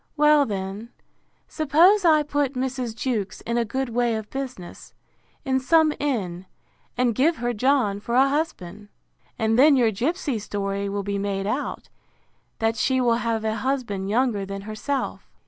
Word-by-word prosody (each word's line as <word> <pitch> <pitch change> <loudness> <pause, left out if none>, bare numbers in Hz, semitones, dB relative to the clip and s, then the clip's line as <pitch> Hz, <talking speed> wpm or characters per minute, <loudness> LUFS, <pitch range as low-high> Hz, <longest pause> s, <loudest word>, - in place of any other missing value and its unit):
Well, 300 -1 +5
then, 200 +2 -5 0.6
suppose 335 +7 +4
I 310 -2 +5
put 290 -2 -1
Mrs. 255 -3 -3
Jewkes 220 -5 -3
in 235 - -3
a - - +2
good 260 +4 -3
way 235 0 0
of 220 -1 -6
business, 255 -10 -7 0.5
in 265 -1 +1
some 310 +3 +3
inn, 190 -11 -2 0.5
and 245 -2 +2
give 300 +9 +2
her 240 -2 -2
John 235 -4 +1
for 235 +3 -3
a 265 +2 +5
husband? 215 - -3 0.5
And 225 0 +1
then 290 +1 +7
your 240 -4 +3
gipsy 275 - -2
story 200 -1 -3
will 200 0 -3
be 200 0 -2
made 195 -1 -2
out, 255 +8 -3 0.7
that 225 0 0
she 260 -1 +1
will 235 -2 +2
have 225 -1 -1
a 220 0 -1
husband 220 -5 -2
younger 230 -2 +1
than 195 0 -6
herself. 215 +7 -4
235 Hz, 160 wpm, -24 LUFS, 205-275 Hz, 0.7 s, then